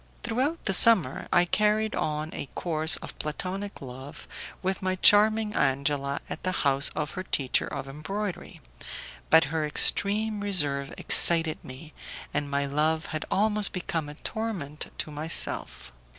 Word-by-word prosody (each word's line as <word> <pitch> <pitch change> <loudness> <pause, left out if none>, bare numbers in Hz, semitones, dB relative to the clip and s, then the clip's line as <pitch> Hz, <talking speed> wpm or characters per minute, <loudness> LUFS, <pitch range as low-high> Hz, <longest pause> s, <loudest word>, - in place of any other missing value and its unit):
Throughout 260 +8 -2
the 195 - 0
summer, 185 - +3
I 175 - +4
carried 210 +3 0
on 155 +1 -3
a - - -6
course 160 -2 +2
of - - -9
Platonic 190 +6 -5
love 130 +2 -10 0.4
with 190 +1 -2
my 185 0 -1
charming 210 +2 +4
Angela 140 0 -1
at - - -7
the 185 - -2
house 140 0 +4
of 150 - -3
her 185 - -6
teacher 140 -8 -1
of - - -6
embroidery, 185 +8 -6 0.7
but 160 - +6
her 160 -1 -1
extreme 205 +7 +1
reserve 145 -9 0
excited 165 -2 +6
me, 140 +5 -11 0.4
and 145 -1 -2
my 140 0 -1
love 155 +3 -1
had 155 - -4
almost 210 0 +2
become 165 -4 -4
a 150 - -10
torment 185 -8 -6
to 155 - -4
myself. 145 - -2
160 Hz, 145 wpm, -26 LUFS, 145-205 Hz, 0.7 s, but